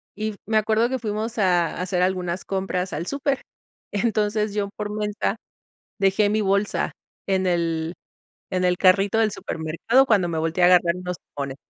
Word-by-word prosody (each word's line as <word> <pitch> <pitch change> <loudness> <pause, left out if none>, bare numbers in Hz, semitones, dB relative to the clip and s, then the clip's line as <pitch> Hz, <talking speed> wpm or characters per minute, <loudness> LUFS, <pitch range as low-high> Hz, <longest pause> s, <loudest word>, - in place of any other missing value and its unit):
Y 215 0 -3
me 220 +1 +1
acuerdo 220 +2 +2
que 260 -1 -2
fuimos 220 +1 -3
a 180 -4 +3
a - - -3
hacer 180 -1 -1
algunas 180 -1 -1
compras 190 -1 -2
al 170 +4 -4
súper. 280 -1 -1 0.5
Entonces, 210 -1 0
yo 205 -1 -1
por 210 0 -4
mensa 210 0 -2 0.6
dejé 195 +1 +3
mi 215 +1 +1
bolsa 200 +1 0 0.3
en 190 -1 +1
el 165 -1 0 0.6
en 185 0 0
el 180 0 +2
carrito 195 +3 +4
del 220 -2 +3
supermercado 170 +11 +1
cuando 200 -8 +2
me 165 - -2
volteé 165 +3 0
a - - +8
agarrar 175 -1 +5
unos 180 -1 -5 0.2
limones. 140 -1 -4
195 Hz, 170 wpm, -23 LUFS, 180-215 Hz, 0.6 s, a